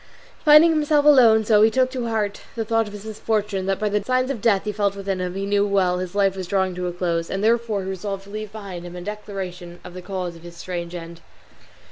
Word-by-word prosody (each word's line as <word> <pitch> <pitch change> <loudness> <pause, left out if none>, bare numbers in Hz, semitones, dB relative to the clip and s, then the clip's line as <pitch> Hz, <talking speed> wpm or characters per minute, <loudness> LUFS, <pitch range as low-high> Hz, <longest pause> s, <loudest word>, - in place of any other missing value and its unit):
Finding 305 +2 +7
himself 300 -2 +2
alone 240 -7 +7
he - - -7
so 215 0 +5
took 255 +2 +1
to 250 -3 -3
heart 210 -3 -2
the 225 -1 -2
thought 225 0 +1
of 205 - -10
his 205 0 -9
misfortune 210 -3 -2
that 195 -1 +1
by 215 - -1
the 205 0 0
signs 255 +3 0
of 240 -7 -5
death 205 -4 +3
he 210 - -2
felt 200 -1 0
within 195 -1 -3
him 180 0 -3
he 195 0 -3
knew 200 0 +2
well 190 -3 +1
his 185 +1 -5
life 195 -2 +2
was 185 -2 -5
drawing 190 -1 0
to 180 0 -3
a - - -2
close, 170 -1 -2
and 195 +1 -3
therefore 225 -3 +1
he 190 - -5
resolved 195 +1 -5
to 200 - -14
leave 215 -1 -6
behind 200 -5 -8
him 175 0 -9
a 180 - -7
declaration 185 -3 -7
of - - -10
the 185 - -8
cause 180 -2 -5
of 165 - -14
his 170 0 -12
strange 175 -1 -5
end. 170 0 -9
200 Hz, 250 wpm, -22 LUFS, 180-220 Hz, -, Finding